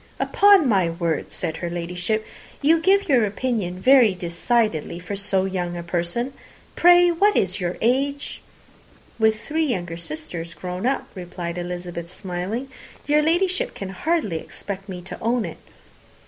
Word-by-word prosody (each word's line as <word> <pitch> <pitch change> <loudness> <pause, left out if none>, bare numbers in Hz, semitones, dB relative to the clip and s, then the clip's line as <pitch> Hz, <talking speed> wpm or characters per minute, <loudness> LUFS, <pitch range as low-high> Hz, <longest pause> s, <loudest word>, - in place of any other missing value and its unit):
"Upon 400 -6 +5
my 190 -7 +3
word," 165 -2 -2
said 165 -2 -3
her 175 - -3
Ladyship, 180 +5 -2 0.3
"you 320 +3 +4
give 395 +3 +3
your 260 -7 +4
opinion 205 -4 -2
very 245 -2 +6
decidedly 175 0 0
for 180 +3 -5
so 195 -1 0
young 180 -2 -3
a 170 - -5
person. 175 +10 -2 0.4
Pray, 350 0 +6
what 395 +5 +3
is 190 0 +1
your 180 -1 -2
age?" 275 +5 0 0.8
"With 220 -1 +3
three 315 +7 -1
younger 175 -9 -3
sisters 165 +1 -6
grown 180 +5 -3
up," 270 - -1
replied 175 -2 -5
Elizabeth, 175 0 -6
smiling, 190 +7 -4 0.4
"your 300 +1 +3
Ladyship 350 +4 +1
can 195 - -5
hardly 210 - -1
expect 195 +3 -7
me 180 -2 -6
to 190 - -8
own 230 -1 +1
it." 165 - -7
195 Hz, 145 wpm, -23 LUFS, 175-260 Hz, 0.8 s, very